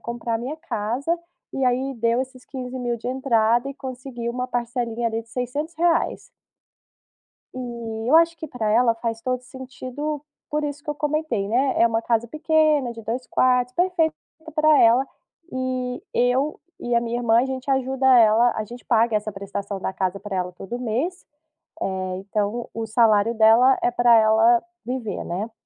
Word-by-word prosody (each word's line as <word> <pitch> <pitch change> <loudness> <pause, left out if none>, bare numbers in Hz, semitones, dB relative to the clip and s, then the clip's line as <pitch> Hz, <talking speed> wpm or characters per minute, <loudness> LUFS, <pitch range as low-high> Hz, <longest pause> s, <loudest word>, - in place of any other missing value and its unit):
comprar 235 -1 -3
minha 265 +6 -5
casa", 280 +2 -2 0.4
e 270 - -1
aí 260 +2 0
deu 230 +1 +1
esses 260 -1 -7
R$15.000 250 -2 -4
de 230 - -9
entrada 240 -1 +2
e 275 - -6
conseguiu 255 -3 -6
uma 250 +1 -3
parcelinha 240 -1 -2
ali 225 0 -2
de 230 - -26
R$600. 305 +8 -1 1.3
E 235 -2 -5
eu 315 - +6
acho 335 0 +4
que 315 - -7
pra 230 -6 -3
ela 230 +1 +4
faz 230 0 -4
todo 255 +1 -2
sentido, 260 +3 -6 0.3
por 300 0 -1
isso 285 -1 -5
que 300 - -4
eu - - -2
comentei, 295 -9 -1
né, 260 +4 +2
é 230 - +7
uma 230 0 0
casa 235 -1 +1
pequena, 305 -3 +2
de 225 -1 -10
2 245 +4 -4
quartos, 250 -1 +2
perfeita 345 -3 +1 0.4
para 310 -1 +5
ela. 240 +4 +5 0.5
E 255 -1 -3
eu 255 +5 +1 0.2
e 240 0 -2
a 235 - +4
minha 235 0 -2
irmã, 230 -1 +3
a 260 - 0
gente 265 +1 -4
ajuda 265 0 0
ela, 230 +2 +5
a 215 - -2
gente 240 +3 -11
paga 230 -1 +3
essa 210 0 -3
prestação 200 0 -5
da 190 - -2
casa 190 +1 -2
pra 200 -1 -5
ela 180 -1 -2
todo 195 +7 -7
mês, 255 +10 -2 0.6
eh, 185 -1 -2
então 205 +4 -3
o 225 0 -3
salário 220 0 +3
dela 230 +4 +5
é - - +3
pra 240 -1 +5
ela 220 +2 +5 0.2
viver, 250 -3 -3
né. 200 +6 -4
245 Hz, 170 wpm, -23 LUFS, 225-265 Hz, 1.3 s, é